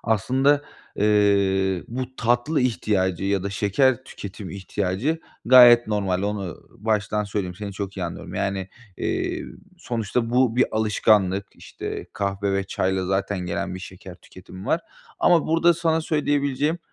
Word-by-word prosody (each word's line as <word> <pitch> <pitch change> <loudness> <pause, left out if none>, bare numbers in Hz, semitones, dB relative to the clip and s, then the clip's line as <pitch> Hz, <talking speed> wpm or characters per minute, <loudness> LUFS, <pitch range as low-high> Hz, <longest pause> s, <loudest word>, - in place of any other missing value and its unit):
Aslında, 130 +7 +2 0.3
eee, 100 -3 +2
bu 130 +2 -5
tatlı 120 +6 +1
ihtiyacı 95 -7 0
ya 100 -1 0
da 100 - -3
şeker 120 +6 +1
tüketimi 100 -5 -8
ihtiyacı 100 - -2 0.2
gayet 120 -1 +8
normal, 100 -3 -1
onu 100 -4 -3
baştan 105 0 -1
söyleyeyim, 100 -3 -3
seni 100 +1 -6
çok 100 0 -6
iyi 95 - -2
anlıyorum, 85 - -7
yani, 95 -1 -2 0.3
eee, - - -2 0.3
sonuçta 115 0 -2
bu 125 -1 +2
bir 125 - +5
alışkanlık, 105 -3 +2
işte, - - -7
kahve 100 0 -2
ve 100 0 0
çayla 95 -1 -1
zaten 95 +1 -1
gelen 90 +1 -3
bir - - -6
şeker 90 0 -10
tüketimi 95 +2 -13
var 165 - +1 0.4
ama 170 -3 +4
burada 165 +2 +4
sana 165 -1 +1
söyleyebileceğim, 145 0 0
105 Hz, 140 wpm, -23 LUFS, 95-125 Hz, 0.4 s, gayet